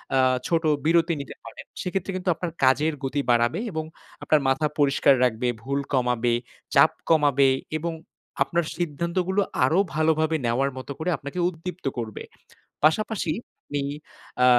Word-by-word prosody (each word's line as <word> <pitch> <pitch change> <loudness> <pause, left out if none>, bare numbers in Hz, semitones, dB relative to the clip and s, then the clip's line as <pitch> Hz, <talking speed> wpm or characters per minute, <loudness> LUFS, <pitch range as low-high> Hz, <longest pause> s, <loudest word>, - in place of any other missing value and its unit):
আ 130 - +4 0.3
ছোট 165 -1 +1 0.2
বিরতি 170 +1 +3
নিতে 140 - -9
পারেন, 115 - -10 0.2
সেক্ষেত্রে 190 +1 -2
কিন্তু 185 0 -2
আপনার 175 0 -4
কাজের 150 +4 +4
গতি 140 +2 -1
বাড়াবে 120 - +2
এবং 160 -1 -2 0.4
আপনার 155 -1 +3
মাথা 150 +3 +2
পরিষ্কার 140 -1 +4
রাখবে, 125 0 +1 0.2
ভুল 140 +2 -1
কমাবে, 125 -2 +2 0.4
চাপ - - +7 0.2
কমাবে 140 -4 +4 0.3
এবং 165 +1 -3 0.5
আপনার 170 +4 -1
সিদ্ধান্তগুলো 175 +4 -1 0.2
আরো 155 +8 +3 0.2
ভালোভাবে 160 0 +2
নেওয়ার 130 +4 +1
মতো 130 +2 -7
করে 170 +3 -1
আপনাকে 140 +6 -6
উদ্দীপ্ত 180 -1 -8
করবে। 110 -3 -5 0.6
পাশাপাশি 185 +1 +2 0.3
আপনি 145 -1 -3 0.6
আ - - +7
155 Hz, 140 wpm, -25 LUFS, 135-170 Hz, 0.6 s, চাপ